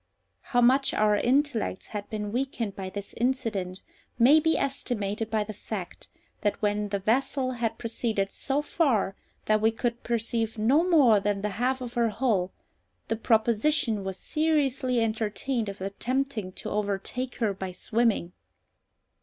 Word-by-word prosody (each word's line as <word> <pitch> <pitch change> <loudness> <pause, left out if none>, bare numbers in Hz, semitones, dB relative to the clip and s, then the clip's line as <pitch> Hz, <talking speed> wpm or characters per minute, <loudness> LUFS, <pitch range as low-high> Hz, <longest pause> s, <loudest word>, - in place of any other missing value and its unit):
How 245 -2 +1
much 265 +3 +4
our 210 -1 +3
intellects 250 -3 0
had 205 -1 -5
been 210 -2 -4
weakened 240 -4 -2
by 190 -1 -5
this 200 +1 -7
incident 220 -7 -1 0.3
may 265 +6 +7
be 320 +1 +2
estimated 225 -6 -2
by 215 -1 +1
the 215 +1 -7
fact, 200 -2 -7 0.3
that 205 - 0
when 210 0 0
the 200 - 0
vessel 255 +5 +1
had 235 -3 -2
proceeded 220 -4 -2
so 280 +2 -1
far 250 - +1 0.3
that 215 0 +3
we 220 - +5
could 235 +1 -2
perceive 230 -1 -1
no 255 +10 +4
more 285 - +5
than 200 0 -1
the 210 - 0
half 250 +6 -1
of 245 -1 -6
her 235 -2 +2
hull, 210 -5 0 0.6
the 225 - +1
proposition 225 +1 +2
was 190 -1 -4
seriously 280 -5 +1
entertained 225 +1 -1
of 195 -1 -8
attempting 235 +1 -2
to - - -6
overtake 210 +5 -2
her 220 -4 0
by 190 -1 -5
swimming! 210 -2 0
225 Hz, 150 wpm, -27 LUFS, 205-255 Hz, 0.6 s, may